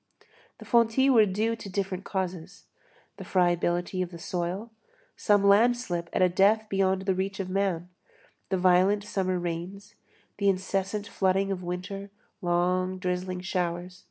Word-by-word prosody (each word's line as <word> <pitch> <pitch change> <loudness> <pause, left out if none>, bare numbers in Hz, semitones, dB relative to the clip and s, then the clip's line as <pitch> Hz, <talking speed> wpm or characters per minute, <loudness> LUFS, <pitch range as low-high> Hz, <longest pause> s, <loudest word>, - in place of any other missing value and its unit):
The - - -12
fontis 235 +3 +3
were 220 -4 +6
due 215 +4 0
to 215 -3 -9
different 195 0 -3
causes: 185 -1 -4 0.5
the - - -8
friability 175 0 +1
of 180 - -2
the 170 - -10
soil; 180 +5 -4 0.4
some 205 -1 +2
landslip 200 -4 +3
at - - +2
a - - +6
depth 205 +4 +3
beyond 190 -1 +1
the 195 -1 +1
reach 190 +1 -3
of 185 -1 -4
man; 185 -3 0 0.6
the 190 - +1
violent 185 +3 +3
summer 185 -3 -1
rains; 180 +4 -5 0.5
the 200 -1 +3
incessant 195 +2 -1
flooding 195 +1 +1
of 185 -2 -3
winter; 185 +3 -5 0.3
long, 180 +1 0
drizzling 180 0 -3
showers. 180 -1 -3
190 Hz, 145 wpm, -27 LUFS, 180-200 Hz, 0.6 s, were